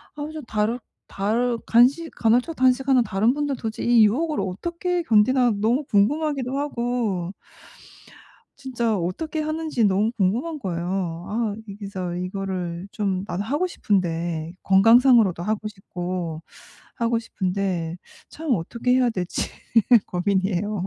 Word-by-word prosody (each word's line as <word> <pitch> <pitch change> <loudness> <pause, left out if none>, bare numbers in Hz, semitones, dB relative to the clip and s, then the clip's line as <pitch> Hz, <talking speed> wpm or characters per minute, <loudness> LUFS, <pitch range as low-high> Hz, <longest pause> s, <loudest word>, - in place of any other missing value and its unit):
아 295 - -7
그래서 310 0 -6
다르 215 +3 0 0.3
다르 230 +4 0
간식 270 +8 +4
간헐적 245 +8 +2
단식하는 260 0 +3
다른 215 +4 +1
분들 290 -2 -1
도저히 230 +1 +1
이 - - +8
유혹을 300 +7 0
어떻게 340 - -2
견디나 240 +1 +4
너무 245 +6 +1
궁금하기도 270 +4 +1
하고. 235 -10 -2 1.3
진짜 235 -5 -1
어떻게 295 - -3
하는지 310 -6 -1
너무 205 +3 +2
궁금한 240 - -1
거예요. 175 -3 -3
아 220 -1 -1 0.3
진짜 185 -3 -4
이거를 180 -1 -4
좀 195 -3 -1
나도 180 +3 -3
하고 295 - 0
싶은데 170 - -1
건강상으로도 225 -2 +5
하고 215 +1 -2
싶고, 175 -5 -5 0.5
하고 230 -1 0
싶은데. 185 -5 -2 0.3
참 320 0 -8
어떻게 235 +8 -3
해야 255 -1 +4
될지 180 -4 -3 0.6
고민이에요. 190 +1 -1
215 Hz, 290 characters per minute, -23 LUFS, 185-255 Hz, 1.3 s, 이